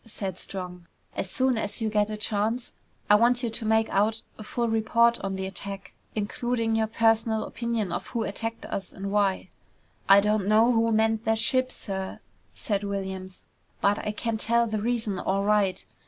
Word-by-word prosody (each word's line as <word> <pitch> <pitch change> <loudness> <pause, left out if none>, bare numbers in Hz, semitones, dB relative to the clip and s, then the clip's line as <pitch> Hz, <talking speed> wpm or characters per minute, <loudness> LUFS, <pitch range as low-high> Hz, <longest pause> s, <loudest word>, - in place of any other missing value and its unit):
said 195 -5 -5
Strong. 180 -2 -7 0.3
"As 190 - -3
soon 255 +2 +1
as 205 +1 -4
you 225 - 0
get 210 -1 +1
a 215 - -4
chance, 215 +3 -1 0.4
I - - +5
want 240 +4 +4
you 235 - -1
to 225 0 -5
make 220 0 +3
out 215 +3 +1
a 215 - -9
full 235 +2 -1
report 230 +1 +3
on 195 0 -3
the 190 0 -3
attack, 195 0 -6 0.2
including 225 +2 -1
your 220 0 +2
personal 225 0 +2
opinion 230 -5 -2
of 175 - -3
who 235 -2 -2
attacked 225 +3 -4
us 195 -2 -5
and 195 0 -5
why." 200 -2 +1 0.6
"I 195 +1 +9
don't 210 -1 +1
know 220 +3 +5
who 230 -1 +2
manned 220 0 +2
that 225 0 +2
ship, 255 +3 +1
sir," 190 -2 -5 0.4
said 205 -2 -1
Williams, 190 -2 -5 0.4
"but 200 +1 +2
I 210 - -2
can 225 +1 -2
tell 235 +2 +2
the 215 -2 -2
reason 225 -4 -1
all 195 +2 0
right. 200 -3 +2
215 Hz, 185 wpm, -27 LUFS, 200-230 Hz, 0.6 s, I